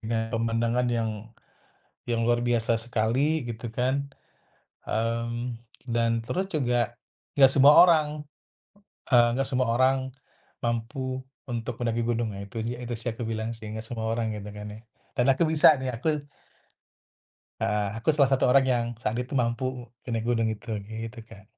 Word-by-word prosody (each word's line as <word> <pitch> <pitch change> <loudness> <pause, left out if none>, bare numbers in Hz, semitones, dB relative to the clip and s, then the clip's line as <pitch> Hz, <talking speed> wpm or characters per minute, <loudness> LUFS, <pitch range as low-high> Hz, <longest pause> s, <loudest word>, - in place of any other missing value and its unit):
dengan 115 0 -1
pemandangan 115 +2 +1
yang 115 -2 0 1.0
yang 115 -1 +1
luar 120 0 +3
biasa 120 -1 +2
sekali 120 +6 0
gitu 115 0 -5
kan, 130 +4 -1 0.8
mmm, 115 +2 -2 0.3
dan 115 0 +1
terus 185 +12 -2
juga 120 -5 +1 0.4
gak 135 -2 +7
semua 140 +1 +7
orang, 165 -4 +6 1.1
eee, 120 -1 +7
gak 135 0 0
semua 130 -2 0
orang, 130 +1 +2 0.6
mampu 130 +3 -2 0.3
untuk 120 -3 -4
mendaki 115 -1 0
gunung, 115 -2 -1
nah 100 - -7
itu 100 +4 -11
sih 120 +2 -2
itu 120 -1 -5
sih 115 - -11
yang 110 - -14
aku 120 - -1
bilang 110 0 -2
sih, 110 -1 -9
nggak 110 - -5
semua 110 -1 -4
orang 115 -1 -1
gitu 105 0 -7
kan 105 0 -7
ya. - - -10 0.4
Dan 125 - +3
aku 135 - 0
bisa 155 -1 +7
nih, 130 -1 -2
aku 150 +5 -1 1.4
Heeh, 105 +1 +1
aku 115 - -6
salah 140 -3 +4
satu 135 - +3
orang 135 +1 +6
yang 120 -1 +1 0.2
saat 110 - 0
itu 125 - -12
mampu 120 +2 -2 0.4
e - - -10
naik 115 -1 -1
gunung 115 -2 +2
itu. 110 - -17 0.4
Gitu, 115 0 -8
Kak. 100 -2 -14
120 Hz, 165 wpm, -27 LUFS, 115-130 Hz, 1.4 s, gak